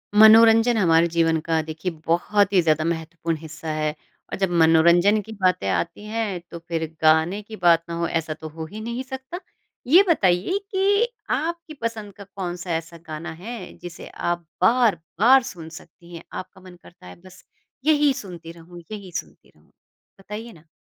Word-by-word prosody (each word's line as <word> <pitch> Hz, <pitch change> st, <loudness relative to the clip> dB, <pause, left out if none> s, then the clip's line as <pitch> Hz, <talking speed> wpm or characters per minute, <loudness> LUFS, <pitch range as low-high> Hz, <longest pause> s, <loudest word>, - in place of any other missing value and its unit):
मनोरंजन 225 Hz, +2 st, +7 dB
हमारे 170 Hz, -4 st, +4 dB
जीवन 165 Hz, -1 st, +1 dB
का 160 Hz, -1 st, +1 dB
देखिए, 155 Hz, +3 st, -5 dB
बहुत 200 Hz, +4 st, +2 dB
ही 185 Hz, -, +5 dB
ज़्यादा 155 Hz, -2 st, +2 dB
महत्वपूर्ण 165 Hz, 0 st, -3 dB
हिस्सा 155 Hz, 0 st, -9 dB
है, 155 Hz, 0 st, -1 dB, 0.4 s
और -, -, -3 dB
जब 195 Hz, -, +1 dB
मनोरंजन 170 Hz, +6 st, +5 dB
की 220 Hz, -, -12 dB
बातें 180 Hz, -, +2 dB
आती 95 Hz, -, -2 dB
हैं, 215 Hz, -4 st, -3 dB
तो 170 Hz, -, -7 dB
फिर 165 Hz, -1 st, -2 dB, 0.2 s
गाने 160 Hz, +6 st, +3 dB
की 215 Hz, +1 st, -10 dB
बात 170 Hz, -4 st, +4 dB
ना 170 Hz, -, -4 dB
हो, 170 Hz, 0 st, -1 dB
ऐसा 165 Hz, -2 st, -2 dB
तो 155 Hz, -, -9 dB
हो 160 Hz, +1 st, -7 dB
ही 215 Hz, +1 st, -7 dB
नहीं 235 Hz, +3 st, -4 dB
सकता। 265 Hz, +5 st, -7 dB, 0.5 s
ये 345 Hz, +9 st, +7 dB
बताइए 190 Hz, -, +2 dB
कि 405 Hz, +4 st, +2 dB, 0.2 s
आपकी 335 Hz, 0 st, -2 dB
पसंद 220 Hz, -3 st, -4 dB
का 200 Hz, +1 st, -11 dB
कौन-सा 180 Hz, -3 st, -6 dB
ऐसा 165 Hz, +1 st, -6 dB
गाना 160 Hz, +1 st, -6 dB
है, 190 Hz, +4 st, -8 dB
जिसे 175 Hz, -2 st, -10 dB
आप 175 Hz, 0 st, -3 dB, 0.2 s
बार-बार 230 Hz, +3 st, +4 dB
सुन 165 Hz, -8 st, -8 dB
सकती 170 Hz, +1 st, -13 dB
हैं? 165 Hz, -, -9 dB
आपका 185 Hz, +1 st, -8 dB
मन 185 Hz, -1 st, -13 dB
करता 175 Hz, -, -17 dB
है 90 Hz, -, -11 dB
बस 185 Hz, -, -15 dB, 0.4 s
यही 295 Hz, -2 st, +4 dB
सुनती 175 Hz, -9 st, -9 dB
रहूँ, 170 Hz, +1 st, -13 dB
यही 200 Hz, -4 st, -8 dB
सुनती -, -, -10 dB
रहूँ। -, -, -28 dB, 0.5 s
बताइए 210 Hz, +4 st, -8 dB
ना? 160 Hz, -2 st, -19 dB
180 Hz, 175 wpm, -23 LUFS, 165-220 Hz, 0.5 s, मनोरंजन